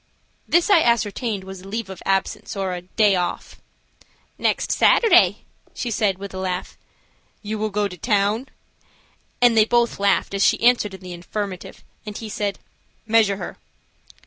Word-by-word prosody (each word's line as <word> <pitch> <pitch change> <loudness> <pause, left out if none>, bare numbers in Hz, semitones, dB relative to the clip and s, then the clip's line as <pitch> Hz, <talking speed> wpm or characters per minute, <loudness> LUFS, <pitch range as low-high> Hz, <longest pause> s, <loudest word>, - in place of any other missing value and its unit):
This 345 +4 +3
I 345 - +7
ascertained 225 -4 0
was 190 -1 -9
a 190 - -12
leave 225 +2 -4
of 190 -1 -9
absence, 195 +1 -1
or 190 -2 -2
"a 180 - -5
day 200 +2 +2
off." 180 -1 -3 0.8
"Next - - 0
Saturday," 455 - +4 0.3
she 240 - -3
said, 205 -4 +1
with 200 0 -8
a 190 - -5
laugh. 185 -1 -4 0.7
"You 215 +1 -4
will 215 0 -1
go 205 0 0
to 180 -2 -10
town?" 210 +4 0 0.9
and 240 -2 +6
they 220 - +6
both 235 -1 +1
laughed 200 0 +1
as 195 0 +1
she - - +3
answered 235 -4 +3
in 190 - -14
the 180 -1 -8
affirmative, 185 +2 -6 0.2
and 210 -2 -7
he 225 - -7
said: 205 -2 -2 0.5
"Measure 215 -3 +3
her." - - -7
205 Hz, 165 wpm, -22 LUFS, 190-225 Hz, 0.9 s, I